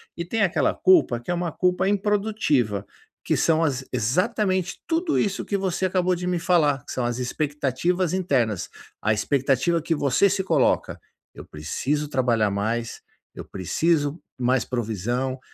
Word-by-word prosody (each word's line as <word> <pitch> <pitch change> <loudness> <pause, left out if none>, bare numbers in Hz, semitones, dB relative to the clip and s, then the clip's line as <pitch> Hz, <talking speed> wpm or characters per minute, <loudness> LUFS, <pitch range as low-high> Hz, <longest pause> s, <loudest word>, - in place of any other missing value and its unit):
E 170 - -4
tem 220 +5 -2
aquela 190 -3 +2
culpa 160 -10 +4
que 120 - -13
é - - +1
uma 175 -1 -2
culpa 180 +3 +1
improdutiva, 200 - 0 0.4
que - - +1
são 165 0 +2
as 135 -4 -1
exatamente 185 - 0
tudo 330 0 0
isso 200 -1 -1
que 200 - -1
você 190 -1 -1
acabou 185 0 +1
de 175 +1 -5
me 180 -1 0
falar, 155 -6 +2
que - - -8
são 125 -2 -2
as 120 0 -2
expectativas 150 +6 -1
internas. 130 - 0 0.3
A 110 - +2
expectativa 135 +7 +1
que 165 - -1
você 145 +6 +3
se 190 0 0
coloca: - - +1 0.4
"Eu - - -10
preciso 135 - -3
trabalhar 120 -6 +1
mais, 115 +4 -2 0.4
eu - - -8
preciso 145 - 0 0.2
mais 125 0 +2
provisão, 120 +3 -2
150 Hz, 155 wpm, -24 LUFS, 125-185 Hz, 0.4 s, culpa